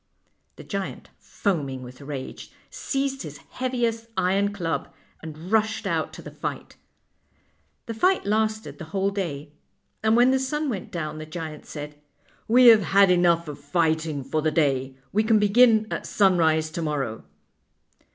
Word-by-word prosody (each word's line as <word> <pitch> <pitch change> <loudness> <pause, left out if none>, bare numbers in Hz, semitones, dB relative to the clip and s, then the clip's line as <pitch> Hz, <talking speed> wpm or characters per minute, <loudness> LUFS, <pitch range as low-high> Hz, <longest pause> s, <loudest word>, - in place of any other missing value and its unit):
The - - -11
giant, 195 -2 -5
foaming 140 -10 -2
with 125 +2 -11
rage, 140 -2 -7 0.2
seized 270 -1 -2
his 150 - -8
heaviest 235 -3 -2
iron 195 +3 +2
club, 170 -5 -3 0.3
and 160 +3 -9
rushed 220 0 +1
out 165 -4 -1
to - - -10
the - - -9
fight. - - -6 1.1
The 230 - -5
fight 365 - +2
lasted 215 +1 -1
the 165 - -6
whole 195 +1 +1
day, 155 -7 -4 0.5
and 220 +1 +3
when 245 +2 +5
the 265 - +2
sun 295 +3 -2
went 215 -2 -5
down 155 -4 -4
the 155 - -8
giant 155 -1 -7
said: 150 -1 -8 0.2
" - - -33
We 250 +3 +6
have 220 -2 +7
had 195 +1 +4
enough 170 -2 +3
of 145 -1 -7
fighting 160 -1 0
for 145 +4 -1
the 155 - +2
day. 135 -4 0 0.2
We 215 +2 +3
can 220 0 +4
begin 220 +1 +5
at - - -4
sunrise 160 -5 +3
to 170 - -4
morrow." 140 - -3
180 Hz, 160 wpm, -25 LUFS, 155-220 Hz, 1.1 s, have